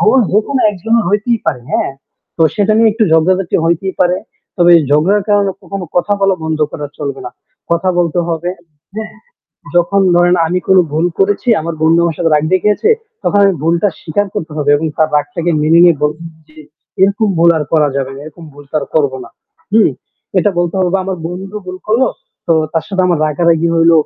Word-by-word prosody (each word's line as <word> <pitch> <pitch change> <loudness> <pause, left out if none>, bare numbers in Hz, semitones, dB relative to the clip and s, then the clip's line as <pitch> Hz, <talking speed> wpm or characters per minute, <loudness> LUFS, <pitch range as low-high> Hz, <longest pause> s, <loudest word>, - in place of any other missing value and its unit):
ভুল 215 +5 +4
যেকোনো 245 +6 +1
একজনের 225 +4 0
হইতেই 215 +3 0
পারে, 140 -6 -1
হ্যাঁ? - - 0 0.4
তো 165 - +1
সেটা 210 0 +1
নিয়ে 225 -1 +5
একটু 225 0 +1
ঝগড়াঝাটি 180 +3 +2
হইতেই 175 +3 -1
পারে। 180 0 +3 0.4
তবে 175 -1 +5 0.2
ঝগড়ার 185 +8 +2
কারণে 205 -1 +2
কখনো 195 -2 -6
কথা 205 +4 +1
বলা 195 -1 +3
বন্ধু। 155 -1 0 0.3
চলবে 140 -2 -5
না। - - -6 0.4
কথা 170 +2 +1
বলতে 175 -1 0
হবে। 170 +2 -2 1.3
যখন 185 +3 +2
ধরেন 175 +1 +4
আমি 180 +2 -1
কোন 190 - +4
ভুল 160 +3 0
করেছি, 205 +5 0
আমার 165 0 -4
বন্ধু 165 +1 +4
আমার 165 - -2
সাথে 165 -2 0
রাগ 150 - +1
দেখিয়েছে, 210 - +1 0.3
তখন 205 - +2
আমি 195 - +3
ভুলটা 170 +4 +1
স্বীকার 200 +6 -1
করতে 160 - -4
হবে 145 -1 -1
এবং 160 +2 -2
তার 155 - +3
রাগটাকে 155 +4 -1
মেনে 160 +2 +4
নিয়ে 170 -2 +5
বলছি 155 +3 -2 0.2
যে 155 - -23 0.5
এরকম 200 +3 +2
ভুল 170 +1 +5
আর 150 - -2
করা 155 -2 +3
যাবে 135 -1 -3
না। 135 - -9
এরকম 155 +2 -12
ভুল 145 0 -13
তো - - -6
আর 140 - -6
করব 140 -4 +2
না। - - -13 0.4
জ্বী, 220 -1 +5 0.5
এটা 205 - +2
বলতে 175 +1 -1
হবে 185 +1 +1
আমার 190 -2 -3
বন্ধু 190 +4 -7
ভুল 185 0 -7
করল। 230 +5 +2 0.4
তো 165 - +3 0.2
তার 165 - 0
সাথে 190 -1 -1
আমার 175 -4 +1
রাগারাগি 165 +2 +1
হইল, 165 0 +4
175 Hz, 190 wpm, -14 LUFS, 160-195 Hz, 1.3 s, নিয়ে